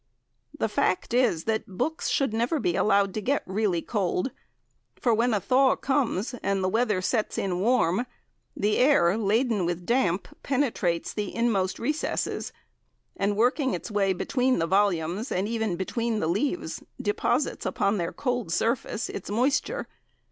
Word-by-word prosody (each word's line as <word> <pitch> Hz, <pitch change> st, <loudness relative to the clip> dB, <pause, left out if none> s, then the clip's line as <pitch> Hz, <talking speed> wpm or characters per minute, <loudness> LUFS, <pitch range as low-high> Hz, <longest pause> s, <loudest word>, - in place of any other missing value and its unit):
The -, -, +1 dB
fact -, -, 0 dB
is 235 Hz, -10 st, +2 dB
that 220 Hz, 0 st, -1 dB
books 320 Hz, +8 st, -1 dB
should 275 Hz, -6 st, +1 dB
never 240 Hz, +8 st, 0 dB
be 175 Hz, -9 st, 0 dB
allowed 200 Hz, -2 st, +3 dB
to 215 Hz, -, -3 dB
get 280 Hz, +7 st, 0 dB
really 190 Hz, -3 st, 0 dB
cold, 200 Hz, +2 st, -1 dB, 0.7 s
for 235 Hz, -, +2 dB
when 235 Hz, +3 st, +2 dB
a 210 Hz, -, +2 dB
thaw 260 Hz, +7 st, +3 dB
comes 260 Hz, -6 st, 0 dB
and 195 Hz, -1 st, 0 dB
the -, -, +2 dB
weather 215 Hz, -3 st, +1 dB
sets 215 Hz, +2 st, 0 dB
in 180 Hz, -2 st, -1 dB
warm, 230 Hz, 0 st, +2 dB, 0.5 s
the 210 Hz, +1 st, +1 dB
air, 250 Hz, -10 st, +4 dB
laden 220 Hz, 0 st, +1 dB
with 175 Hz, 0 st, -2 dB
damp, 195 Hz, -6 st, +1 dB
penetrates 230 Hz, -11 st, 0 dB
the 205 Hz, -2 st, -4 dB
inmost 210 Hz, -6 st, +1 dB
recesses, 300 Hz, +6 st, -2 dB, 0.6 s
and 200 Hz, +1 st, 0 dB
working 255 Hz, +4 st, +2 dB
its -, -, -7 dB
way 200 Hz, -2 st, +2 dB
between 255 Hz, +7 st, +1 dB
the 165 Hz, -, +1 dB
volumes 190 Hz, -, +1 dB
and 190 Hz, +3 st, 0 dB
even 220 Hz, -4 st, -1 dB
between 225 Hz, +5 st, -2 dB
the -, -, -1 dB
leaves, 215 Hz, -, -1 dB, 0.2 s
deposits 415 Hz, -, 0 dB
upon 200 Hz, 0 st, 0 dB
their 170 Hz, -1 st, -2 dB
cold 245 Hz, -9 st, -2 dB
surface 230 Hz, +3 st, 0 dB
its 190 Hz, -, -7 dB
moisture. 275 Hz, -, 0 dB
215 Hz, 155 wpm, -26 LUFS, 190-250 Hz, 0.7 s, air